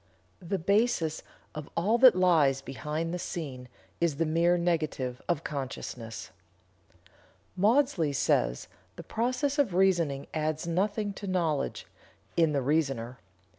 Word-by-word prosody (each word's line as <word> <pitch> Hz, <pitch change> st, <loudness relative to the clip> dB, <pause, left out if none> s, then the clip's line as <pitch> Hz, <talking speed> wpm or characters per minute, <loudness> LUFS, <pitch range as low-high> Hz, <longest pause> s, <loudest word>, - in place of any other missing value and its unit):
The 185 Hz, +3 st, -2 dB
basis 200 Hz, -3 st, +1 dB, 0.3 s
of 155 Hz, -1 st, -7 dB
all 210 Hz, +8 st, +2 dB
that 255 Hz, -4 st, +8 dB
lies 155 Hz, -7 st, +3 dB
behind 150 Hz, +5 st, -4 dB
the 180 Hz, -, -3 dB
scene 135 Hz, -8 st, -5 dB, 0.3 s
is 170 Hz, -4 st, +1 dB
the 165 Hz, +3 st, 0 dB
mere 170 Hz, +3 st, +3 dB
negative 155 Hz, -7 st, -1 dB
of 170 Hz, -2 st, 0 dB
consciousness." 125 Hz, -5 st, -6 dB, 1.2 s
Maudsley 205 Hz, -, +2 dB
says: 65 Hz, -, +1 dB, 0.3 s
"The -, -, -9 dB
process 255 Hz, +5 st, -1 dB
of 230 Hz, -11 st, +2 dB
reasoning 170 Hz, -7 st, +2 dB
adds 155 Hz, +1 st, -1 dB
nothing 200 Hz, +4 st, -1 dB
to 200 Hz, +1 st, -8 dB
knowledge 170 Hz, -6 st, -1 dB, 0.5 s
(in 165 Hz, -2 st, +3 dB
the 140 Hz, -3 st, 0 dB
reasoner). 135 Hz, -5 st, -1 dB
165 Hz, 125 wpm, -29 LUFS, 140-190 Hz, 1.2 s, that